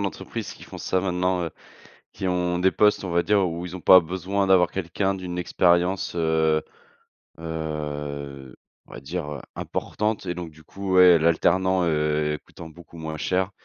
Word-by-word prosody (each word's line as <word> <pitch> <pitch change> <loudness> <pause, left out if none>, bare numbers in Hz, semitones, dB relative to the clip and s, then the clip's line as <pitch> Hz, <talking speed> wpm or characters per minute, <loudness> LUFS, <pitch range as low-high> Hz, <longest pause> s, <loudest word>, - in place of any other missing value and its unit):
d'entreprises 100 -2 -5
qui - - -13
font - - -10
ça, 95 - 0
maintenant, 90 -1 0
heu, 85 - -4 0.6
qui 95 - -3
ont 90 -1 0
des 95 +1 +4
postes, 105 +1 +3
on 90 - -4
va 85 0 +2
dire, 100 +2 +3
où 85 -3 -1
où - - -5
ils 90 - -8
ont - - -9
pas 95 +2 +8
besoin 95 +3 -2
d'avoir 90 -2 +4
quelqu'un 95 +2 -1
d'une 90 -2 -6
expérience, 90 +1 +1
heu 80 -2 +2 0.8
heu, 75 -4 -5 0.3
on - - -18
va - - -8
dire, 75 +2 -5
heu, 70 - -8
importante 105 0 -3
et 90 - -2
donc 85 -2 -6
du 80 +1 -19
coup, 95 +2 -4
ouais, 90 -1 +8
l'alternant, 90 +3 +2
heu, 75 -1 0
coûtant 85 -1 -11
beaucoup 85 +1 -15
moins 80 -1 -5
cher, 95 +3 0
90 Hz, 180 wpm, -24 LUFS, 80-95 Hz, 0.8 s, pas